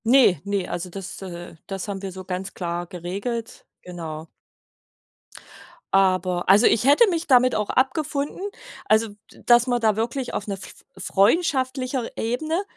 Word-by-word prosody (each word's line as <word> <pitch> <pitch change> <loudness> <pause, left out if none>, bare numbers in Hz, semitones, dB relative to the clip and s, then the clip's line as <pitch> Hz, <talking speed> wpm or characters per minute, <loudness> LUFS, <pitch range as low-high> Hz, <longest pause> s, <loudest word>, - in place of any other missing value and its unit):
Ne, 235 - +5
ne, 200 -2 -1
also 175 +1 -4
das 190 +1 -8
äh, 175 -2 -8
das 195 0 -5
haben 195 -2 -4
wir 195 -1 -5
so 185 +1 -8
ganz 190 +1 -5
klar 175 -1 -3
geregelt, 200 +7 -5 0.2
genau. 165 -3 -7 1.7
Aber 185 -2 +2
also 205 +5 +7
ich 225 - +2
hätte 290 - +6
mich 340 -2 -2
damit 255 -2 +5
auch 210 -1 -1
abgefunden, 280 +3 0 0.5
also 220 +1 +3 0.2
d - - -18
dass 240 +1 +5
wir 245 -1 +1
da 220 -3 +2
wirklich 240 +3 -2
auf 205 - -3
'ner 200 - -2
f 195 - -13
freundschaftlicher 255 - +1
Ebene, 310 - -1
210 Hz, 150 wpm, -23 LUFS, 185-255 Hz, 1.7 s, also